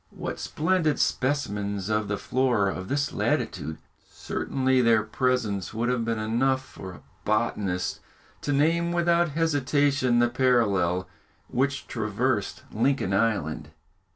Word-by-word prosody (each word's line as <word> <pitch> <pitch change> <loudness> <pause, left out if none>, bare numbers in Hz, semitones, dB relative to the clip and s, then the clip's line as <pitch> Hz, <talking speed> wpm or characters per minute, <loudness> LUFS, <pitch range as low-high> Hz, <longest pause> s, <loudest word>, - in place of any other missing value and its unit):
What - - -6
splendid 160 -2 +1
specimens 105 -8 -1
of 105 -1 0
the 105 - -1
Flora 120 -7 +1
of 95 0 -6
this 140 +3 -1
latitude! 80 +2 -1 0.3
Certainly 130 -1 0
their 115 -2 +4
presence 110 -4 -1
would 120 +2 0
have 125 -2 0
been 115 0 -1
enough 130 +5 +1
for 95 - -9
a 90 - -13 0.2
botanist 105 -4 -1 0.4
to 145 - -2
name 165 +4 +2
without 170 0 +2
hesitation 145 -4 +2
the 120 0 +4
parallel 105 -8 +2 0.4
which 140 +2 0
traversed 110 0 -1
Lincoln 115 -4 +1
Island. 90 -9 0
120 Hz, 125 wpm, -26 LUFS, 105-140 Hz, 0.4 s, their